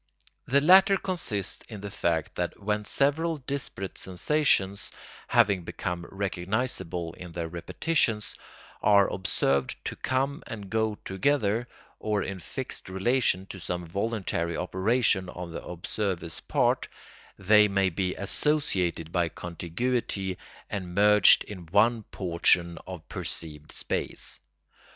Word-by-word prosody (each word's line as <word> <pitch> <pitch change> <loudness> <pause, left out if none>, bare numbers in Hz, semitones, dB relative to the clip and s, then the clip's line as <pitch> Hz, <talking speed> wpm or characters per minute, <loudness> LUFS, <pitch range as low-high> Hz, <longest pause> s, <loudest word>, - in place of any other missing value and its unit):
The 140 +2 +4
latter 190 +5 +7
consists 165 - -1
in 105 -4 -8
the 100 0 -6
fact 85 -6 -1
that - - -3
when 105 +1 -1
several 155 +8 +2
disparate 130 -8 -4
sensations, 100 - +1 0.4
having 100 -3 +4
become 85 +1 -4
recognisable 95 -3 -2
in 90 -1 -10
their 85 0 -3
repetitions, 105 - 0 0.5
are 100 -1 +5
observed 70 -7 +1
to - - -3
come 135 +2 -1
and 100 -4 -7
go 110 -1 +1
together, 115 +1 +1 0.3
or 105 -2 0
in 95 0 -5
fixed 85 - -5
relation 95 0 +1
to 95 - -9
some 90 0 -3
voluntary 95 -3 -2
operation 95 +1 +1
on 90 -1 -7
the - - -6
observer's 90 -1 -3
part, - - +1 0.5
they 105 +2 +6
may 95 -2 +2
be 90 +2 -1
associated 95 - 0
by 85 -2 +1
contiguity 95 +3 -2 0.3
and 90 -3 -5
merged 105 0 +7
in 90 -5 -9
one 110 +6 +3
portion 85 -1 +2
of 90 -4 -8
perceived 75 -2 -6
space. - - -3
95 Hz, 120 wpm, -28 LUFS, 90-115 Hz, 0.5 s, latter